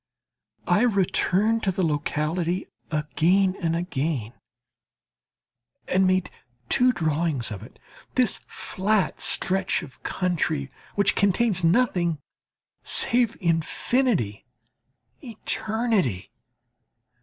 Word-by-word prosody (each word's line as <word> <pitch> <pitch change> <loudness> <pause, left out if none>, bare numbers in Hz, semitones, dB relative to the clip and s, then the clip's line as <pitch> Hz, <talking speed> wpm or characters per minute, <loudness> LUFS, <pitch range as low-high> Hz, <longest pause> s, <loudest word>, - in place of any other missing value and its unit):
I - - +3
returned 215 0 +1
to 195 - 0
the 185 -1 -1
locality 160 +4 -1 0.2
again 175 +5 +1
and 165 -1 0
again, 150 - -2 1.5
and 190 0 +2
made 185 0 +1 0.4
two 250 +1 +4
drawings 155 - -1
of 100 -2 -6
it 115 - -13 0.4
this 250 -5 +3
flat 200 +1 -1
stretch 190 0 +1
of 130 -2 -13
country 160 -6 -2 0.2
which 200 - +3
contains 200 -1 +2
nothing 175 -3 +2 0.6
save 240 -2 +3
infinity, 170 - 0 0.8
eternity. 220 - -1
180 Hz, 85 wpm, -24 LUFS, 155-210 Hz, 1.5 s, two